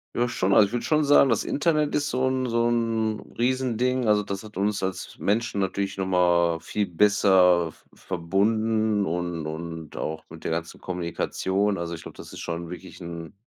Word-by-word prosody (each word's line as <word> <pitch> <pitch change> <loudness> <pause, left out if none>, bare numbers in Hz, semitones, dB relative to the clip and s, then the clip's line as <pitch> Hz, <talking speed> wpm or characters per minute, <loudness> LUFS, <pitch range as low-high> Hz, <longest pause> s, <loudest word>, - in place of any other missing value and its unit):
Ja 120 +1 +1
schon. 95 -4 0
Also, 100 - +7
ich 100 - -11
würde 120 - -2
schon 155 -1 +2
sagen, 140 -1 +6
das 115 - +2
Internet 150 -1 +1
ist 145 0 0
so 130 +1 +1
'n 130 0 0
so 115 0 +1
'n 115 -2 -1
Riesending. 125 0 +1
Also, 105 -1 +4
das 100 0 -5
hat 105 -2 -9
uns 100 +1 0
als 95 -1 -4
Menschen 110 +1 0
natürlich 100 +1 -2
noch 95 - -1
mal 85 -2 +3
viel 105 -1 -2
besser 90 -3 +4
v - - -25
verbunden. 105 +4 0
Und 85 -1 -3
und 80 0 -6
auch 80 0 -4
mit 80 0 -12
der - - -2
ganzen 80 0 -4
Kommunikation. 95 +3 -1
Also, 85 0 -4
ich 80 - -9
glaube, - - -11
das - - -10
ist - - -9
schon 85 0 -4
wirklich 90 +2 -10
'n 85 -2 -7
100 Hz, 190 wpm, -25 LUFS, 85-115 Hz, -, Also